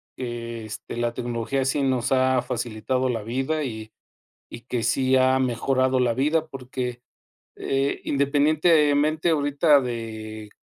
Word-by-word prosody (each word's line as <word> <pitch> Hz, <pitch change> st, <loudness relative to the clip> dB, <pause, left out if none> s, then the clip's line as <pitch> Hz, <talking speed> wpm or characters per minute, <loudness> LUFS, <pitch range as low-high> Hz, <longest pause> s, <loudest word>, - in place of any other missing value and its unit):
que 120 Hz, -2 st, -5 dB
este 110 Hz, +1 st, -8 dB
la 120 Hz, 0 st, -1 dB
tecnología 120 Hz, +3 st, -2 dB
sí 140 Hz, +2 st, 0 dB
nos 130 Hz, -2 st, +1 dB
ha 130 Hz, -1 st, +3 dB
facilitado 120 Hz, +2 st, -2 dB
la 115 Hz, -3 st, -2 dB
vida 135 Hz, +7 st, -1 dB
y 110 Hz, -4 st, -6 dB, 0.6 s
y -, -, -8 dB
que 120 Hz, -1 st, -3 dB
sí 130 Hz, +3 st, +2 dB
ha 130 Hz, 0 st, +4 dB
mejorado 130 Hz, +1 st, +1 dB
la 120 Hz, -2 st, +2 dB
vida 150 Hz, +6 st, +1 dB
porque, 125 Hz, -3 st, -5 dB, 0.6 s
eh, 135 Hz, +1 st, -1 dB
independientemente 150 Hz, +2 st, +2 dB
ahorita 145 Hz, 0 st, +3 dB
de 110 Hz, -3 st, -6 dB
130 Hz, 130 wpm, -24 LUFS, 120-140 Hz, 0.6 s, ha